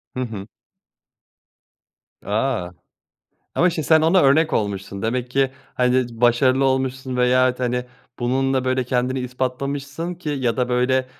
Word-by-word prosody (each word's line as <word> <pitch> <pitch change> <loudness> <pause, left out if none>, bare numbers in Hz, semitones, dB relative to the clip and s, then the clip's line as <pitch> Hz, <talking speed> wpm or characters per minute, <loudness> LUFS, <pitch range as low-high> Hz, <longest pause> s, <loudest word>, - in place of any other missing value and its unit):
Hı - - -3
hı. 105 -5 -6 1.8
A! 110 -3 -1 0.9
Ama 180 +1 +3
şimdi 160 -3 -4
sen 160 -1 +5
ona 165 +4 +4
örnek 155 +4 +4
olmuşsun. 100 -1 -2
Demek 125 +2 -2
ki, 135 0 +1 0.2
hani, 125 0 +2
başarılı 120 +3 +3
olmuşsun 130 -1 -1
veyahut, 125 0 +3
hani, 125 0 -1 0.3
bununla, 130 +1 0
böyle, 130 0 0
kendini 125 +1 -1
ispatlamışsın 140 +6 -3
ki 175 -2 -8
ya 130 -4 -1
da 125 -1 0
böyle, 130 +1 +1
130 Hz, 130 wpm, -21 LUFS, 125-135 Hz, 1.8 s, sen